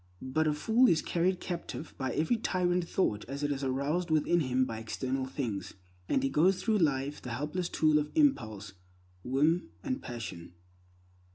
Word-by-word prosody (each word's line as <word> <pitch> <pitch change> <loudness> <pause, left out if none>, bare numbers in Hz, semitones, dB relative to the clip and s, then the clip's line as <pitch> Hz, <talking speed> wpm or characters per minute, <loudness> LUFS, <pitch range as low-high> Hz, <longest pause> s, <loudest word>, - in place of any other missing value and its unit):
But 155 +5 +1
a 150 - +2
fool 230 +11 +4
is 165 - +2
carried 180 +2 +1
captive 170 -3 -5
by 130 -1 -2
every 160 +10 +1
tyrant 180 -4 0
thought 105 - 0
as 140 +3 -5
it 145 - +1
is 140 0 -2
aroused 140 +7 0
within 160 +2 +3
him 130 -3 +1
by 115 -3 -5
external 130 +4 -3
things, 120 -8 -4 0.3
and 270 - +2
he 275 - +2
goes 185 - +3
through 220 -2 +2
life 145 -3 0
the 125 - -7
helpless 150 +8 -2
tool 155 -1 +3
of 150 0 -2
impulse, 110 - +1 0.5
whim, 150 +7 +1
and 260 -3 -2
passion. 95 -8 -7
150 Hz, 170 wpm, -31 LUFS, 130-180 Hz, 0.5 s, fool